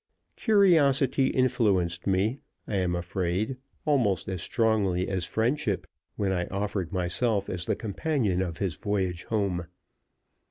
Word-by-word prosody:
Curiosity 150 - +4
influenced 100 -11 +1
me, 100 +7 +1 0.3
I 100 - -1
am 90 -2 0
afraid, 90 +6 -2 0.3
almost 120 - +2
as 95 -3 -3
strongly 100 -6 +1
as 95 -2 -1
friendship, 115 -2 0 0.3
when 100 -2 0
I 90 -2 -1
offered 100 -3 -3
myself 100 +3 0
as 85 -2 -2
the - - +1
companion 110 - -1
of 85 -3 -3
his 95 -4 -1
voyage 95 -2 -2
home. 95 -6 -1
100 Hz, 125 wpm, -27 LUFS, 90-120 Hz, 0.3 s, Curiosity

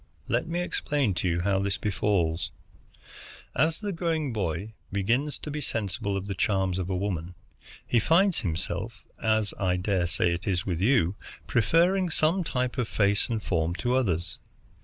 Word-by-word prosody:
Let - - 0
me 170 +2 -1
explain 145 - 0
to 90 +1 -1
you 85 0 0
how 95 +1 +2
this 100 0 0
befalls. 90 -5 0 1.1
As 160 +5 +2
the 205 -2 -3
growing 160 -6 -1
boy 100 +1 -2 0.2
begins 120 +9 +1
to 150 - -7
be 150 +1 -3
sensible 100 -4 -2
of 95 - -4
the 100 - -3
charms 95 -2 +1
of 90 0 -3
woman, 90 -2 -2 0.5
he 120 - +3
finds 175 - +3
himself, 95 +6 -3 0.2
as 110 -2 +2
I 90 -2 +2
dare 90 -1 +1
say 85 0 +1
it 85 +2 -5
is 90 -2 0
with 90 -3 -2
you, 100 -5 +3 0.3
preferring 175 - +3
some 165 +4 +2
type 125 -4 -1
of 120 - +1
face 100 +1 +2
and 110 -2 -2
form 85 -1 0
to 120 +6 0
others. 90 -8 0
100 Hz, 165 wpm, -27 LUFS, 90-135 Hz, 1.1 s, he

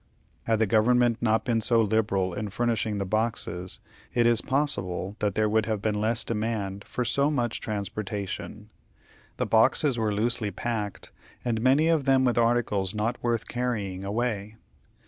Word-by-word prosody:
Had 115 -1 +2
the 110 - +3
government 115 +2 +3
not 110 -1 +2
been 115 -3 +1
so 115 +1 +3
liberal 100 -4 +1
in 105 +3 -4
furnishing 110 0 -1
the 100 - -2
boxes, 100 -4 -2 0.4
it 120 -1 +3
is 120 -1 +4
possible 100 -9 -1
that 105 -2 0
there 110 0 +2
would 110 0 +1
have 110 -2 -1
been 110 +1 0
less 115 +2 +1
demand 105 -3 -3
for 125 - -3
so 140 +5 +2
much 120 -6 -1
transportation. 105 0 -5 0.7
The - - 0
boxes 120 +3 +3
were 110 -1 +1
loosely 110 +1 0
packed, 105 0 -4 0.3
and 115 -2 0
many 135 +6 +4
of 160 -4 +2
them 135 -1 +4
with 120 -1 +2
articles 115 -4 +1
not 115 +3 -1
worth 115 -2 -1
carrying 105 -7 -3
away. 105 0 -2
110 Hz, 160 wpm, -27 LUFS, 105-120 Hz, 0.7 s, is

